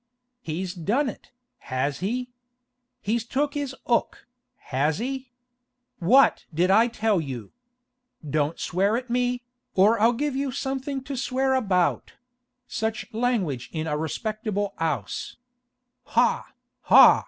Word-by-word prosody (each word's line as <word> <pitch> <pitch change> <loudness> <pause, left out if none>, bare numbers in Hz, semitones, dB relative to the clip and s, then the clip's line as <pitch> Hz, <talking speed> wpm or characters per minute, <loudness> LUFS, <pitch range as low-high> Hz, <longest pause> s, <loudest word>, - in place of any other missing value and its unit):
'He's 180 0 -3
done 220 - 0
it, - - -11 0.3
has 135 +2 -2
he? 245 +6 -2 0.7
He's 225 +2 0
took 280 +4 -1
his 285 -3 -3
'ook, 235 - 0 0.3
has 145 +4 -1
he? 260 +1 -4 0.7
What 250 +10 +4
did 175 +4 +2
I 225 +4 +6
tell 220 -5 +1
you? 125 -8 -6 0.8
Don't 150 +2 0
swear 200 +5 +1
at 250 -1 -6
me, 245 0 0 0.3
or 210 +4 +5
I'll 230 +2 +5
give 285 +3 -1
you 275 0 -1
something 270 +1 -3
to 275 0 -5
swear 265 +1 0
about—such 245 +2 -2
languidge 215 - 0
in 160 -1 -3
a 150 -2 -1
respectable 205 - -2
'ouse! 160 -3 -2 0.7
Ha, - - +2 0.3
ha? - - +8
225 Hz, 120 wpm, -25 LUFS, 175-255 Hz, 0.8 s, ha